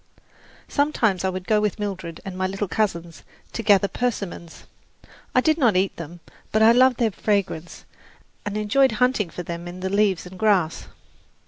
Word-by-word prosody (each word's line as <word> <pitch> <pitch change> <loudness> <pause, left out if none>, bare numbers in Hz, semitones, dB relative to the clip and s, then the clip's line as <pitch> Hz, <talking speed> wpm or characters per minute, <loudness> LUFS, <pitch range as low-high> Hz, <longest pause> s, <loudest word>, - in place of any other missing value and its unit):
Sometimes 230 - +1
I 190 - +1
would 185 0 -5
go 215 +1 +2
with 210 -2 -1
Mildred 190 -5 -5
and 190 -2 -6
my 185 0 -1
little 195 +2 -3
cousins 170 -4 -2 0.3
to - - -3
gather 200 -2 +4
persimmons. 200 -8 -4 0.7
I 255 - +6
did 315 +3 +2
not 235 -8 +3
eat 190 +1 +1
them; 170 +1 -9 0.3
but 215 0 +3
I 225 - +8
loved 255 +1 +5
their 230 -3 +1
fragrance 195 -5 -2 0.6
and 205 0 -4
enjoyed 240 +5 +3
hunting 245 -5 +1
for 180 - -7
them 170 +1 -6
in 180 +1 -8
the 190 0 -2
leaves 200 -3 +2
and 185 +1 -11
grass. 195 -7 +1
200 Hz, 175 wpm, -23 LUFS, 180-220 Hz, 0.7 s, I